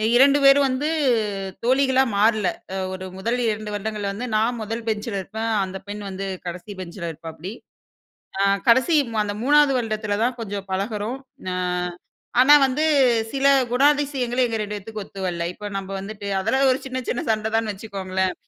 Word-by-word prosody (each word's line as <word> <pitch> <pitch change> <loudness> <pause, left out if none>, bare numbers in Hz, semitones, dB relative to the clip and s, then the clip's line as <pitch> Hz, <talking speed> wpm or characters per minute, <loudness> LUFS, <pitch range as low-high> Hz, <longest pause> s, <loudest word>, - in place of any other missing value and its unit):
2 275 +3 +6
பேரும் 275 +1 +7
வந்து 265 +4 -1 0.8
தோழிகளா 265 +1 +3
மாறல, 215 -1 +3 0.3
அ - - -3 0.2
ஒரு 185 0 -6
1 230 +6 -1
2 215 0 -3
வருடங்கள்ல 205 -1 -3
வந்து 235 +5 -4
நான் 230 +3 +1
1 225 +2 -4
பெஞ்சில 210 -1 -2
இருப்பேன், 220 +4 -4
அந்த 190 0 -5
பெண் 205 0 -6
வந்து 195 +1 -5 0.2
கடைசி 180 +4 -6
பெஞ்சில 170 -1 -6
இருப்பாப்படி. 165 +4 -8 0.9
அ - - +4 0.3
கடைசி 260 +7 +5 0.3
அந்த 205 0 -3
3வது 290 +1 +5
வருடத்தில 215 -3 -2
தான் 245 0 0
கொஞ்சம் 200 -2 -5
பழகுறோம். 210 +5 -2 0.3
அ, - - -2 0.9
ஆனா 290 +3 +8
வந்து 270 +4 0 0.5
சில 275 0 +1 0.3
குணாதிசயங்கள் 270 -2 +2
எங்க 225 -1 -2
2 210 0 -4
பேத்துக்கும் 210 0 -7
ஒத்து 195 - -10
வல்ல. 170 -1 -3
இப்ப 210 0 -7
நம்ம 195 0 -7
வந்துட்டு, 200 +1 -7
அதெல்லாம் 265 +7 +2
ஒரு 255 - -2
சின்ன 260 0 -3
சின்ன 245 - -1
சண்ட 220 0 0
தான்னு 225 -2 0
வச்சுக்கோங்களேன். 190 -3 -2
220 Hz, 160 wpm, -23 LUFS, 200-255 Hz, 0.9 s, ஆனா